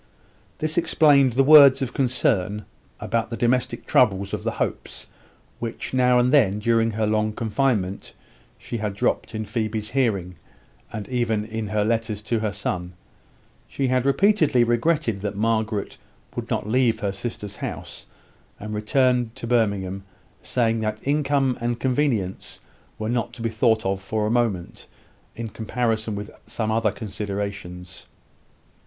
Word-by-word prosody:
This 155 +2 0
explained 140 -6 +4
the 135 +3 +4
words 140 -2 +8
of 125 -1 -4
concern 105 -6 0 0.3
about 115 -1 -1
the 115 - -4
domestic 125 +1 0
troubles 100 -5 +2
of - - -3
the - - -1
Hopes, - - -4 0.5
which, 115 +1 -5
now 125 -1 +4
and 125 +2 +3
then 105 -9 +4
during 115 +1 +2
her 110 0 -1
long 110 0 +1
confinement, 110 -4 -1 0.4
she 120 - -5
had 105 -2 -3
dropped 110 - -1
in 110 0 -3
Phoebe's 110 0 -3
hearing, 100 - 0 0.5
and 105 -3 -6
even 115 -4 0
in 110 -1 -4
her 105 0 0
letters 110 -2 -1
to 115 +1 0
her 110 -1 -1
son. 90 -3 -4 0.7
She 135 -2 -2
had 130 +1 +1
repeatedly 155 - +4
regretted 120 -2 +1
that 105 -1 -3
Margaret 110 -1 -1 0.4
would - - -5
not - - -1
leave 115 -1 +2
her 100 -1 0
sister's 105 0 -6
house, - - -7 0.5
and 105 +1 -6
return 125 +2 +2
to - - -6
Birmingham 100 -5 0 0.4
saying 115 -2 0
that 110 0 -3
income 140 -3 +1
and 120 0 -1
convenience 125 -8 -1 0.4
were 110 - -3
not 120 0 -1
to 115 - -8
be 115 - +1
thought 110 0 +2
of 95 0 -1
for 105 +2 -2
a 105 - 0
moment, 115 -8 -1 0.5
in 115 0 -5
comparison 110 0 -2
with 105 +1 -6 0.2
some 110 -1 -2
other 110 -1 +2
considerations. 100 -4 -6
115 Hz, 150 wpm, -23 LUFS, 105-125 Hz, 0.7 s, words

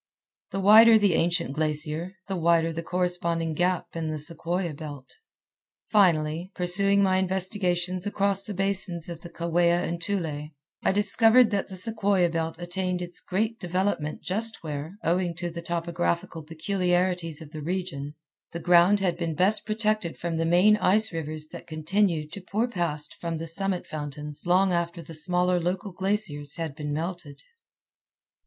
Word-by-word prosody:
The 195 0 -3
wider 220 +3 +8
the 205 -4 +3
ancient 170 -3 +1
glacier, 155 +4 -1
the 195 - -2
wider 165 -1 +2
the 165 - -4
corresponding 170 -2 -1
gap 180 +2 -1
in 165 -1 -2
the 155 - -3
sequoia 170 +2 -3
belt. 145 -3 -8 0.8
Finally, 170 -3 +2
pursuing 195 +2 +2
my 185 -1 +3
investigations 185 -1 -1
across 200 -1 +1
the 200 0 -6
basins 190 -3 0
of 170 -1 -7
the 170 - -9
Kaweah 170 +1 +1
and 170 0 -4
Tule, 160 -6 -3 0.3
I - - +2
discovered 225 +4 +5
that 200 -1 -1
the 190 - -8
sequoia 200 -3 +2
belt 165 -1 -2
attained 180 +1 -2
its 175 -1 -4
greatest 220 +5 -2
development 180 -4 -2
just 220 +5 -2
where, 155 +4 -6
owing 175 0 0
to 175 0 -4
the 170 0 -6
topographical 170 -1 -2
peculiarities 175 0 -1
of 155 -3 -11
the 155 -2 -7
region, 155 -4 -4 0.4
the 170 - -4
ground 175 +3 +5
had 175 -3 0
been 165 -2 -3
best 200 +4 +2
protected 215 -5 0
from 170 -1 -3
the 165 0 0
main 185 +5 +5
ice 215 +1 +2
rivers 155 -1 -4
that - - -10
continued 160 0 0
to 200 - -8
pour 215 +6 -1
past 170 -9 -2
from 170 -1 -4
the 165 - -5
summit 185 +2 -2
fountains 150 +1 -3
long 185 +1 +3
after 170 0 -2
the 165 - -10
smaller 180 +3 +1
local 185 +3 -2
glaciers 180 -6 -1
had 165 -3 -4
been 150 0 -5
melted. 155 -2 -5
175 Hz, 160 wpm, -26 LUFS, 165-195 Hz, 0.8 s, wider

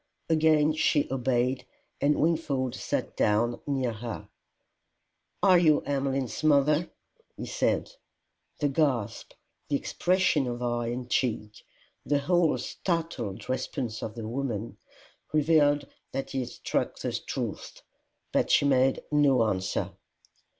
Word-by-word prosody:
Again 155 -1 +4
she 155 -1 +2
obeyed, 130 0 0 0.4
and 145 +1 +3
Wingfold 150 -6 0
sat - - -3
down 115 +3 +1
near 130 -4 0
her. 115 0 -7 1.1
"Are 185 -3 +7
you 155 -4 +4
Emmeline's 135 -3 -2
mother?" 150 +2 +3 0.5
he - - -5
said. - - 0 0.7
The 145 - +1
gasp, 135 -7 -1 0.4
the 145 - +1
expression 180 -2 +1
of 120 0 -4
eye 120 -1 -1
and 120 +1 -4
cheek, 110 -4 -1 0.4
the 145 - +1
whole 165 0 +2
startled 160 - -3
response 130 -3 -3
of 110 - -5
the 115 -2 -5
woman, 115 -3 -3 0.6
revealed 145 -2 +3 0.3
that 135 0 -3
he 135 - -1
had 125 -2 -3
struck - - -2
the - - -3
truth. - - -5 0.5
But - - +1
she - - +4
made 135 -1 +3
no 140 -5 +4
answer. 95 -4 -1
135 Hz, 120 wpm, -28 LUFS, 120-150 Hz, 1.1 s, Are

